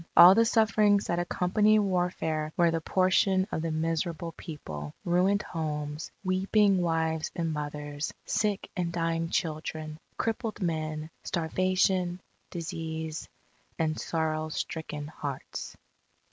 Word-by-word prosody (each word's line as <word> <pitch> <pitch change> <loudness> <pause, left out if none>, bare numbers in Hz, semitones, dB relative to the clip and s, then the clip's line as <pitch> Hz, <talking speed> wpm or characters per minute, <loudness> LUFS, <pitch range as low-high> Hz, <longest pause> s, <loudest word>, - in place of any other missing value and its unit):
All 175 +2 +11
the 230 +3 +5
sufferings 215 -2 +4
that 170 - 0
accompany 195 +5 +3
warfare 175 -6 0
were 170 -1 +5
the 165 0 -1
portion 185 +2 +3
of - - -1
the 165 - -1
miserable 165 +1 -1
people, 75 - -7
ruined 185 +4 +3
homes, 150 -2 -4
weeping 195 +1 +3
wives 160 -2 0
and 165 -2 -1
mothers, 145 0 -4
sick 210 -2 0
and 175 -3 -1
dying 165 -1 -1
children, 155 -1 -3 0.2
crippled 225 -1 -2
men, 155 -3 -2
starvation, 185 +1 +1 0.3
disease, 160 -1 -4 0.5
and 155 -1 0
sorrow 155 -1 -1
stricken 155 -1 -4
hearts. 145 -3 -6
165 Hz, 115 wpm, -29 LUFS, 155-185 Hz, 0.5 s, All